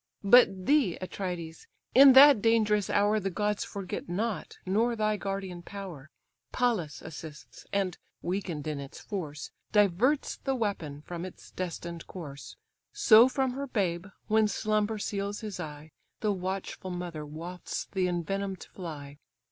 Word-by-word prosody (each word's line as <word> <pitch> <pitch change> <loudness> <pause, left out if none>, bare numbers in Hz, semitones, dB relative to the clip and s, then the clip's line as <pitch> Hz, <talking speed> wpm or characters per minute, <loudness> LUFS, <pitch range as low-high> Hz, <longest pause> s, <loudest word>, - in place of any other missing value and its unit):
But 195 -4 +6
thee, 280 - +3
Atrides! 180 -3 -5 0.3
in 270 +1 +9
that 275 -3 +9
dangerous 215 -2 +3
hour 205 +1 +3
The 195 -1 -2
gods 210 +3 -1
forget 195 -3 -6
not, 210 +4 -3
nor 225 +6 +1
thy 215 -1 +1
guardian 195 -3 -4
power, 175 -7 -8 0.4
Pallas 220 -12 0
assists, 150 -8 -10
and 195 -3 -1 0.2
(weakened 175 -5 -3
in 150 -2 -3
its 140 -1 -9
force) 155 -8 -6 0.2
Diverts 210 - +2
the 270 -1 -2
weapon 165 - -3
from 175 0 -6
its 185 - -10
destined 170 -1 -5
course: 145 -6 -9 0.4
So 250 - +7
from 265 -1 0
her 275 +2 -4
babe, 190 -7 -1 0.2
when 220 0 +3
slumber 215 +1 0
seals 200 0 -3
his 210 -4 -6
eye, 155 -1 -7 0.3
The 215 - +2
watchful 190 0 -4
mother 175 -3 -5
wafts 165 +4 -6
the 185 -2 +1
envenom'd 190 +2 -2
fly. 145 -5 -8
195 Hz, 140 wpm, -29 LUFS, 170-215 Hz, 0.4 s, in